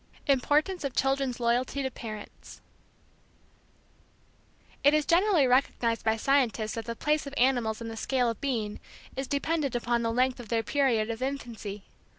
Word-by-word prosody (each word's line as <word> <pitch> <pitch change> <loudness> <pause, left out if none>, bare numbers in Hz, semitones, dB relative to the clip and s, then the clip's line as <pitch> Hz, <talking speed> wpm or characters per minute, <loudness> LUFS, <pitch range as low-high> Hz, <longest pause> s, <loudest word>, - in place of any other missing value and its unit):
IMPORTANCE 295 +6 +2
OF 275 -3 -3
CHILDREN'S 270 -2 0
LOYALTY 245 +4 0
TO 265 - -2
PARENTS 215 -3 -9 2.2
It 285 +2 +6
is 305 -1 +2
generally 350 -3 +4
recognized 245 -2 +1
by 220 0 +2
scientists 235 -4 +1
that 225 -1 -5
the 230 - -4
place 300 +3 0
of 280 - -7
animals 240 -4 +2
in 230 - -5
the 225 - -6
scale 250 +2 0
of 230 -2 -3
being 225 -7 -2 0.4
is 270 0 -3
dependent 285 -2 -1
upon 240 0 0
the 230 0 0
length 255 +2 +1
of 235 -4 -9
their 225 0 +1
period 235 -4 +1
of 230 +2 -6
infancy. 235 -7 -5
250 Hz, 160 wpm, -28 LUFS, 230-280 Hz, 2.2 s, It